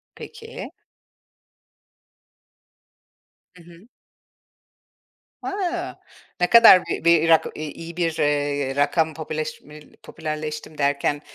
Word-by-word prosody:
Peki. 455 Hz, +1 st, -10 dB, 2.8 s
Hı 175 Hz, -, -16 dB
hı. 170 Hz, +5 st, -17 dB, 1.5 s
A! 360 Hz, -3 st, -4 dB, 0.5 s
Ne 180 Hz, -, +2 dB
kadar 230 Hz, -6 st, +8 dB
bi -, -, -4 dB
bir 165 Hz, -1 st, +4 dB
rak 165 Hz, -1 st, +5 dB
i 155 Hz, -, -6 dB
iyi 165 Hz, +2 st, -10 dB
bir, 170 Hz, -2 st, 0 dB
eee, 145 Hz, -2 st, 0 dB
rakam 155 Hz, +3 st, +1 dB
popüleşme 155 Hz, -1 st, -7 dB, 0.2 s
popülerleştim 155 Hz, -1 st, -6 dB
derken, 145 Hz, 0 st, 0 dB
155 Hz, 90 wpm, -22 LUFS, 150-175 Hz, 2.8 s, kadar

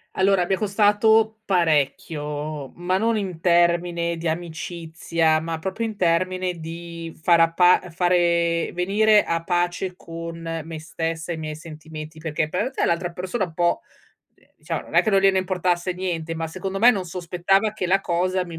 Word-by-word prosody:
Allora 190 Hz, -1 st, +3 dB
mi 190 Hz, -, 0 dB
è 190 Hz, -, +2 dB
costato 220 Hz, +1 st, +3 dB
parecchio, 150 Hz, -4 st, -1 dB
ma 180 Hz, +2 st, 0 dB
non 225 Hz, +1 st, +1 dB
in 185 Hz, -5 st, -4 dB
termine 170 Hz, -1 st, +2 dB
di 165 Hz, +1 st, -4 dB
amicizia, 165 Hz, -1 st, -1 dB
ma 165 Hz, 0 st, -4 dB
proprio 190 Hz, +6 st, -5 dB
in 220 Hz, -2 st, -2 dB
termine 185 Hz, +1 st, +1 dB
di 165 Hz, 0 st, -7 dB
far 170 Hz, +1 st, +4 dB
appa 165 Hz, +2 st, +5 dB
uhm, 180 Hz, -, -10 dB
fare 170 Hz, -1 st, +1 dB
venire 205 Hz, +4 st, +3 dB
a 165 Hz, 0 st, -2 dB
pace 175 Hz, +1 st, -1 dB
con 165 Hz, -1 st, -6 dB
me 160 Hz, -1 st, -6 dB
stessa 165 Hz, +1 st, -4 dB
e -, -, -2 dB
i -, -, -8 dB
miei 155 Hz, -1 st, -5 dB
sentimenti, 155 Hz, 0 st, -10 dB
perché 155 Hz, 0 st, -1 dB
p -, -, -19 dB
ete 225 Hz, +9 st, 0 dB
l'altra 170 Hz, +1 st, 0 dB
persona 185 Hz, +4 st, -2 dB
un 165 Hz, -3 st, -14 dB
po', 175 Hz, 0 st, +2 dB, 0.6 s
ehm, -, -, -29 dB
diciamo, -, -, -4 dB
non -, -, -13 dB
è -, -, +7 dB
che 215 Hz, -, +1 dB
non 195 Hz, -, +4 dB
gliene 195 Hz, -1 st, +4 dB
importasse 180 Hz, -1 st, 0 dB
niente, 170 Hz, -3 st, -3 dB
ma 165 Hz, 0 st, -3 dB
secondo 190 Hz, +3 st, -4 dB
me 240 Hz, +3 st, +8 dB
non 195 Hz, -6 st, -2 dB
sospettava 180 Hz, +4 st, 0 dB
che 215 Hz, -4 st, -3 dB
la 190 Hz, +2 st, +3 dB
cosa 185 Hz, +1 st, 0 dB
mi 170 Hz, -2 st, -8 dB
175 Hz, 180 wpm, -23 LUFS, 165-185 Hz, 0.6 s, me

